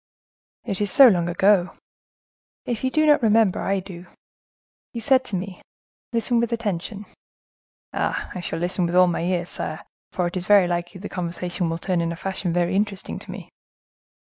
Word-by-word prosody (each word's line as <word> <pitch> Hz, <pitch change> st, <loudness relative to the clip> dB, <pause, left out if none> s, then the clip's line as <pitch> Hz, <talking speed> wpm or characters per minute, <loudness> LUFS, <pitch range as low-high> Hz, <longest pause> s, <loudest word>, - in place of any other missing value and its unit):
"It 200 Hz, -3 st, -4 dB
is 205 Hz, -, +1 dB
so 270 Hz, -2 st, +9 dB
long 175 Hz, -4 st, +1 dB
ago." 185 Hz, +1 st, +2 dB, 0.9 s
"If 240 Hz, -1 st, -3 dB
you 260 Hz, -, +2 dB
do 310 Hz, +3 st, +2 dB
not 295 Hz, -2 st, +5 dB
remember, 220 Hz, -3 st, +3 dB
I 195 Hz, 0 st, 0 dB
do. 180 Hz, -1 st, -10 dB, 0.9 s
You 235 Hz, -, -4 dB
said 260 Hz, +2 st, +4 dB
to 205 Hz, -, -4 dB
me,—listen 220 Hz, +5 st, -4 dB
with 235 Hz, 0 st, 0 dB
attention." 210 Hz, -2 st, -3 dB, 0.9 s
"Ah! -, -, -2 dB
I 185 Hz, -, -5 dB
shall 170 Hz, -2 st, -4 dB
listen 175 Hz, +1 st, -1 dB
with 170 Hz, -, -3 dB
all 185 Hz, 0 st, +7 dB
my 175 Hz, -2 st, -1 dB
ears, 175 Hz, 0 st, -1 dB
sire; 155 Hz, +1 st, -5 dB, 0.3 s
for 180 Hz, -, -1 dB
it 175 Hz, -, -3 dB
is 185 Hz, 0 st, -4 dB
very 205 Hz, -3 st, +6 dB
likely 175 Hz, +2 st, -3 dB
the 205 Hz, -, -6 dB
conversation 175 Hz, 0 st, -3 dB
will 165 Hz, -, -2 dB
turn 180 Hz, 0 st, -1 dB
in 170 Hz, 0 st, -1 dB
a -, -, -4 dB
fashion 190 Hz, 0 st, -3 dB
very 175 Hz, +1 st, 0 dB
interesting 200 Hz, -1 st, -2 dB
to -, -, -14 dB
me." -, -, -8 dB
185 Hz, 180 wpm, -23 LUFS, 175-210 Hz, 0.9 s, so